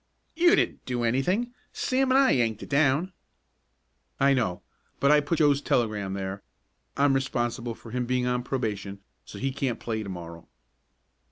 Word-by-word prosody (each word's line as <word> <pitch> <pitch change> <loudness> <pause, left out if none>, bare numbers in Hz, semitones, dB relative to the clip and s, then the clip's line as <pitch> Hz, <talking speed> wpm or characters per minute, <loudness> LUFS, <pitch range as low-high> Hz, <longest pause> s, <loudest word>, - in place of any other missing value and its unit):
"You 345 +1 +5
didn't - - 0
do 125 -2 -1
anything 180 - 0 0.2
Sam 265 +1 0
and 260 - +5
I 270 -1 +5
yanked 115 -4 +1
it - - -10
down." 145 +5 +2 1.1
"I 140 0 +5
know, 110 -9 -1 0.4
but 140 - +4
I 150 - +6
put 150 +3 -1
Joe's 145 -2 +3
telegram 105 -7 0
there 95 0 -4 0.6
I'm 140 0 +4
responsible 120 -3 -1
for 115 - -13
him 125 0 -2
being 125 0 0
on 125 0 0
probation, 105 -6 -3 0.2
so - - -10
he 135 0 -1
can't 130 -3 -2
play 110 -2 -3
to 100 - -6
morrow." 85 -2 -8
125 Hz, 165 wpm, -27 LUFS, 110-145 Hz, 1.1 s, I